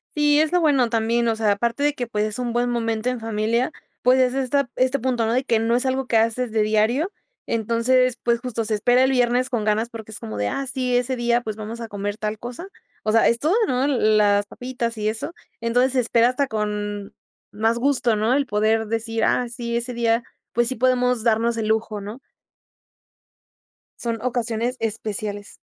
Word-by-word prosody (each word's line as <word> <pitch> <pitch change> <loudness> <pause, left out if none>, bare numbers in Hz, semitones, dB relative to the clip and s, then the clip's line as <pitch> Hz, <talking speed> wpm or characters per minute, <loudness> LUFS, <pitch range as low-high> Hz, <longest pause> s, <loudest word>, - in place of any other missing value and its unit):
Sí, 295 0 +4
es 310 0 +2
lo 360 0 +2
bueno 275 -7 +3
también, 230 +1 +1
o 225 - +1
sea, 220 -2 +1
aparte 235 +6 -1
de 295 0 +3
que, 245 -4 -4
pues, 210 -2 -1
es 215 +3 -3
un 245 -1 -2
buen 245 +1 +1
momento 230 0 -1
en 250 -1 -3
familia, 225 +4 0 0.3
pues, 255 +1 +4
es 255 -1 +3
esta 270 0 0
este 255 +2 +2
punto, 245 -2 0
¿no? 225 - +1
De 255 +2 +1
que 235 -4 +1
no 230 +1 +1
es 250 - +1
algo 260 0 -1
que 230 - +2
haces 230 +2 +1
de 220 0 +1
diario, 220 - +1 0.3
entonces, 235 +3 +1
pues, 235 -1 +2
justo 230 -2 -3
se 215 - -1
espera 245 +5 +3
el 265 - +3
viernes 250 0 +2
con 235 -4 0
ganas 215 +2 0
porque 220 -2 -9
es 215 - -2
como 110 -1 -6
de: 105 0 0
"Ah, 275 - -3
sí, 255 -1 -1
ese 250 +1 0
día, 240 0 +1
pues, 215 -3 -5
vamos 220 +2 -7
a 230 - -5
comer 205 0 -4
tal 215 0 -3
cosa", 245 - -7 0.4
o 215 - +1
sea, 225 +1 +4
es 235 - +3
todo, 310 +7 +1
¿no? 255 +1 +1
Las 215 -6 +3
papitas 245 -1 -4
y 210 0 -1
eso, 220 +9 -3 0.3
entonces 245 +3 +2
se 260 - +2
espera 235 0 +3
hasta 270 +2 0
con 210 -2 -3 0.4
más 225 +2 0
gusto, 245 -3 +2
¿no? 215 +3 +1
El 280 0 +1
poder 220 +1 +1
decir: 225 0 -2
"Ah, 250 - +2
sí, 235 -1 -3
ese 240 +1 -3
día, 235 0 +1 0.3
pues, 240 0 +2
sí 260 - +1
podemos 250 -1 +2
darnos 230 0 +2
el 220 -1 -1
lujo", 220 -1 -1
¿no? 210 +6 -8 1.8
Son 230 -1 -2
ocasiones 240 0 -1
especiales. 210 -2 -3
235 Hz, 210 wpm, -22 LUFS, 220-250 Hz, 1.8 s, Sí